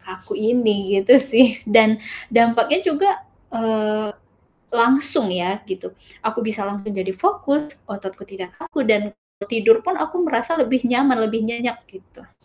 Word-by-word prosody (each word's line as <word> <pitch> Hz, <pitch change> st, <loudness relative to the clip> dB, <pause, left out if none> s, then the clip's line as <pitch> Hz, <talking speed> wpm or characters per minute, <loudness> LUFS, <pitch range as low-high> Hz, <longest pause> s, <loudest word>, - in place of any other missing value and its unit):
kaku 185 Hz, 0 st, -10 dB
ini, 215 Hz, -3 st, +1 dB
gitu 255 Hz, +7 st, +7 dB
sih. 250 Hz, -1 st, +4 dB
Dan 220 Hz, 0 st, +5 dB, 0.3 s
dampaknya 235 Hz, +7 st, +3 dB
juga, 375 Hz, +1 st, +2 dB, 0.4 s
eee, 215 Hz, -2 st, -2 dB, 0.6 s
langsung 240 Hz, +1 st, +3 dB
ya, 180 Hz, +2 st, -2 dB
gitu, 375 Hz, -, -7 dB, 0.3 s
aku 220 Hz, +1 st, -2 dB
bisa 220 Hz, -2 st, -3 dB
langsung 200 Hz, +1 st, -6 dB
jadi 190 Hz, 0 st, -3 dB
fokus, 295 Hz, -, -2 dB
ototku 195 Hz, -2 st, -9 dB
tidak 190 Hz, -2 st, -11 dB
kaku 310 Hz, -5 st, -4 dB
dan 210 Hz, -2 st, +2 dB, 0.4 s
tidur 225 Hz, 0 st, +4 dB
pun 370 Hz, +1 st, -2 dB
aku 355 Hz, +3 st, -2 dB
merasa 285 Hz, +1 st, -1 dB
lebih 260 Hz, -3 st, +1 dB
nyaman, 250 Hz, 0 st, +2 dB
lebih 220 Hz, 0 st, -1 dB
nyenyak, 235 Hz, +1 st, -4 dB
gitu. 380 Hz, -, -20 dB
230 Hz, 140 wpm, -20 LUFS, 210-265 Hz, 0.6 s, gitu